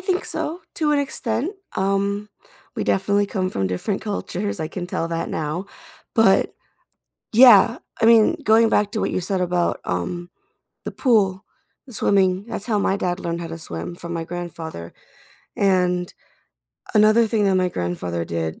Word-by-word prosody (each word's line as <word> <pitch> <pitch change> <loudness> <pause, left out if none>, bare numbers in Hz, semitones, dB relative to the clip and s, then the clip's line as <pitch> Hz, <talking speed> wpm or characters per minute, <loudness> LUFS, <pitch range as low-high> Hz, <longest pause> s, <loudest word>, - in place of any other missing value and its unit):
think 375 0 -1
so 340 +4 -4
to 305 -2 +1
an 295 - +3
extent. 270 - -1 0.2
Um, 200 +2 0 0.5
we - - -2
definitely 200 +1 +1
come 185 -2 -2
from 95 - -1
different 95 - -2
cultures, 205 -2 -3
I 155 - -2
can 180 -2 -5
tell 165 -2 -3
that 165 0 -3
now, 160 +5 -3 0.5
but - - +4 0.8
yeah, 230 -1 +7 0.2
I - - +4
mean, 225 -1 +6
going 225 +1 +5
back 205 -1 +2
to 220 - -2
what - - -1
you - - -1
said 185 +1 -1
about, 175 -1 0
um, 175 - -3 0.6
the - - -5
pool, 200 -7 +2 0.4
the 255 - -13
swimming, 190 -3 +2
that's 220 -2 -5
how 220 -4 +1
my 195 -1 +1
dad 180 -1 -2
learned 170 0 -3
how 170 - -5
to 165 0 -7
swim 85 - -6
from 170 0 -7
my 165 -1 -3
grandfather, 165 - -7 0.6
and 180 -2 +1 0.8
another 215 +2 +5
thing 215 -1 +1
that 195 -1 +3
my 185 -1 +2
grandfather 85 - -3
did, 80 -1 -4
190 Hz, 165 wpm, -22 LUFS, 170-215 Hz, 0.8 s, yeah